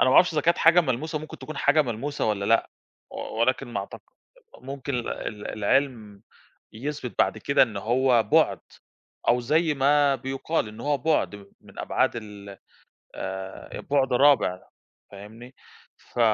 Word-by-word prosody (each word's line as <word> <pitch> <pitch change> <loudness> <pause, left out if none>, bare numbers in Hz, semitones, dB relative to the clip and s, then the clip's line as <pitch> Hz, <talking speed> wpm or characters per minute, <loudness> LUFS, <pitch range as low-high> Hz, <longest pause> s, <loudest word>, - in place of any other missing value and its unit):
أنا - - +5
ما 130 - +3
أعرفش 180 -1 +6
إذا 150 - +1
كانت 170 +3 +2
حاجة 170 +2 +6
ملموسة 155 +2 -2
ممكن 155 +1 -10
تكون 155 -2 -8
حاجة 145 +2 +3
ملموسة 130 +5 -3
والّا 100 -2 -1
لأ 115 +2 +2 0.4
و - - -10 0.2
ولكن 130 +2 +1
ما 105 -4 -3
أعتق 100 - -9 0.6
ممكن 140 +1 -6
ال 120 - -3
ال 105 -2 -6
العِلم 110 -2 -1 0.5
يثبِت 130 +2 -5
بَعد - - +2
كده 140 - +3
إن 110 -5 -5
هو 120 +3 +2
بُعد - - +3 0.7
أو 120 +1 +4
زي 155 +6 +1
ما 140 0 +3
بيُقال 135 0 -2
إن 110 +1 -11
هو 145 0 0
بُعد 150 -6 0
م 100 -1 -13 0.2
من - - -14
أبعاد - - +1
ال 100 -3 -9 0.6
آآ 95 0 -6
بُعد 135 -2 0
رابع 125 -9 +4 0.5
فاهمني؟ 110 +6 -12 0.4
ف - - -14
130 Hz, 160 wpm, -25 LUFS, 110-145 Hz, 0.7 s, أعرفش